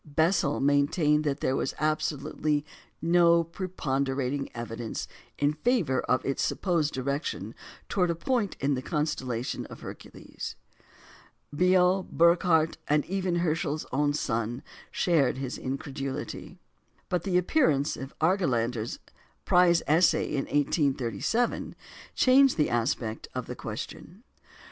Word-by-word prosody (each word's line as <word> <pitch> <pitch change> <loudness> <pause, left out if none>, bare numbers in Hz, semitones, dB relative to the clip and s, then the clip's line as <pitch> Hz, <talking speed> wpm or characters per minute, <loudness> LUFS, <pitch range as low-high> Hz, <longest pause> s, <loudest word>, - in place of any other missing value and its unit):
Bessel 155 0 +1
maintained 145 +2 +2
that 140 -2 -1
there 130 - +1
was - - -2
absolutely 150 -1 -1 0.4
no 170 0 +5
preponderating 140 -6 -2
evidence 115 -1 -5 0.3
in 145 +1 +2
favour 155 - +1
of 125 - +1
its 135 - -1
supposed 165 -6 0
direction 140 +4 -3 0.3
towards 180 -3 +1
a - - -2
point 220 +3 -1
in 140 +1 +1
the 130 - -2
constellation 130 -6 -2
Hercules. - - -9 1.0
Biot, 180 +2 +3
Burckhardt, 170 -1 +4 0.3
even 185 -1 -1
Herschel's 160 -2 -1
own 145 +2 +1
son, 115 -1 -2 0.3
shared 155 -8 +2
his 130 -1 -4
incredulity. 135 +5 -5 0.5
But 180 -3 0
the 180 0 +1
appearance 175 - +2
of 135 +1 -9
Argelander's 125 - 0 0.5
prize 175 -1 +4
essay 165 +4 +3
in 140 -2 -1
1837 145 - 0 0.4
changed 265 -1 +5
the 150 - +2
aspect 115 -2 -1
of - - -3
the - - -6
question. 200 +6 -7
150 Hz, 110 wpm, -28 LUFS, 135-175 Hz, 1.0 s, no